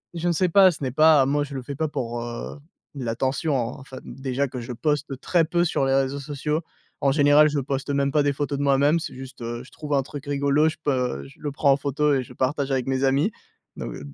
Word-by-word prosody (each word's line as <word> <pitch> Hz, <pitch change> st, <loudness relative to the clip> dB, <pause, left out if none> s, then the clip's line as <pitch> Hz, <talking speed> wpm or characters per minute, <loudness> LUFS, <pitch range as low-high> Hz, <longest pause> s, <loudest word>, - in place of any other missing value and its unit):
je 170 Hz, +1 st, -2 dB
ne -, -, +2 dB
sais 180 Hz, +2 st, +1 dB
pas. 190 Hz, +1 st, +7 dB
Ce 150 Hz, -, -10 dB
n'est 130 Hz, -, 0 dB
pas 155 Hz, 0 st, +5 dB
moi 145 Hz, +1 st, +1 dB
je 140 Hz, -, -10 dB
le 130 Hz, -, -3 dB
fais 140 Hz, -, -6 dB
pas 160 Hz, +3 st, -1 dB
pour, 120 Hz, -3 st, -3 dB
heu, 120 Hz, +4 st, -6 dB, 0.4 s
l'attention, 130 Hz, +4 st, -1 dB
en 125 Hz, +2 st, -4 dB
fait, 130 Hz, -, -9 dB
déjà 135 Hz, +1 st, -2 dB
que 125 Hz, -1 st, -6 dB
je 120 Hz, +1 st, -7 dB
poste 145 Hz, +1 st, -2 dB
très 175 Hz, -2 st, +2 dB
peu 175 Hz, +2 st, +1 dB
sur 140 Hz, -4 st, 0 dB
les 135 Hz, -, +1 dB
réseaux 135 Hz, +1 st, 0 dB
sociaux. 150 Hz, +2 st, -2 dB, 0.4 s
En 140 Hz, -, +3 dB
général, 145 Hz, +1 st, +5 dB
je 145 Hz, -, -1 dB
poste 135 Hz, +1 st, -3 dB
même 140 Hz, 0 st, +1 dB
pas 150 Hz, +1 st, +3 dB
des 145 Hz, 0 st, +1 dB
photos 145 Hz, 0 st, -2 dB
de 145 Hz, -, 0 dB
moi-même, 140 Hz, +4 st, +3 dB
c'est -, -, -6 dB
juste, 130 Hz, 0 st, -10 dB
heu, 120 Hz, 0 st, -4 dB
je 135 Hz, -, -17 dB
trouve 150 Hz, -2 st, -5 dB
un 135 Hz, -2 st, +2 dB
truc 145 Hz, +1 st, -9 dB
rigolo, 140 Hz, +2 st, +2 dB
je 155 Hz, -, -8 dB
peux 125 Hz, -, -1 dB
je -, -, -17 dB
le 145 Hz, -, -3 dB
prends 140 Hz, 0 st, +3 dB
en -, -, +1 dB
photo 145 Hz, +1 st, +1 dB
et 130 Hz, -, +1 dB
je -, -, -13 dB
partage 140 Hz, +1 st, -1 dB
avec 130 Hz, -2 st, 0 dB
mes 130 Hz, 0 st, 0 dB
amis, 140 Hz, +10 st, +2 dB, 0.5 s
donc -, -, -5 dB
d 70 Hz, -1 st, -10 dB
140 Hz, 255 wpm, -24 LUFS, 130-150 Hz, 0.5 s, pas